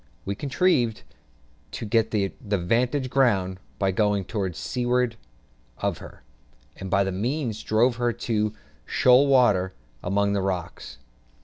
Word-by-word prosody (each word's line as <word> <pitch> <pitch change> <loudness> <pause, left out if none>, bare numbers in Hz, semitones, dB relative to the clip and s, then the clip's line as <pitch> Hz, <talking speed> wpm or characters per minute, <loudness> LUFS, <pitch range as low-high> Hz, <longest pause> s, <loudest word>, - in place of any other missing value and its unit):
We 100 - -2
contrived 130 - +1 0.7
to - - -5
get 115 +1 +2
the 100 -3 -1
"'vantage 120 +6 0
ground" 95 -9 +2 0.2
by 95 -1 +1
going 100 0 +1
to 100 -3 -2
seaward 125 +5 -1 0.6
of - - -2
her, - - -13 0.5
and 95 - -7
by 100 +1 +3
that 95 - -2
means 115 +3 -2
drove 115 +3 +2
her 120 -1 +1
into 110 -2 -1 0.3
shoal 130 +3 +4
water 105 -9 +3 0.3
among 100 +2 +1
the 100 - 0
rocks. 90 -3 -4
110 Hz, 130 wpm, -25 LUFS, 95-125 Hz, 0.7 s, shoal